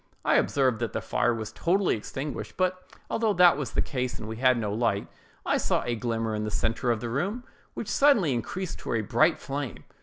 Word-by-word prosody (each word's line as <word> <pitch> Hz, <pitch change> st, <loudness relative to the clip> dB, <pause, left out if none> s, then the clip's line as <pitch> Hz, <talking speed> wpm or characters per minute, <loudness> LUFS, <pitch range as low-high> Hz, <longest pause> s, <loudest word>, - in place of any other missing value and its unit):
I -, -, +4 dB
observed 130 Hz, -5 st, +2 dB
that -, -, -2 dB
the -, -, -1 dB
fire 120 Hz, -, +1 dB
was 110 Hz, -2 st, -4 dB
totally 180 Hz, -, +1 dB
extinguished; 135 Hz, +6 st, -6 dB
but 185 Hz, 0 st, -1 dB, 0.2 s
although 225 Hz, -2 st, +1 dB
that 175 Hz, -4 st, +6 dB
was 145 Hz, -2 st, -3 dB
the -, -, +2 dB
case, 125 Hz, -3 st, -3 dB
and 110 Hz, -, -7 dB
we 110 Hz, 0 st, -5 dB
had 130 Hz, 0 st, +4 dB
no 105 Hz, -3 st, -2 dB
light, 110 Hz, -3 st, 0 dB, 0.4 s
I -, -, +2 dB
saw -, -, 0 dB
a 120 Hz, -, 0 dB
glimmer 115 Hz, -1 st, -2 dB
in 105 Hz, 0 st, -2 dB
the 105 Hz, -, -2 dB
centre 115 Hz, +3 st, -1 dB
of 115 Hz, -2 st, +1 dB
the 120 Hz, -, -3 dB
room, 195 Hz, -, -2 dB, 0.3 s
which -, -, -5 dB
suddenly 230 Hz, -, +4 dB
increased 175 Hz, +10 st, -4 dB
to -, -, -4 dB
a 115 Hz, -, +1 dB
bright 155 Hz, -, +3 dB
flame. 140 Hz, -4 st, -5 dB
130 Hz, 215 wpm, -27 LUFS, 115-175 Hz, 0.4 s, that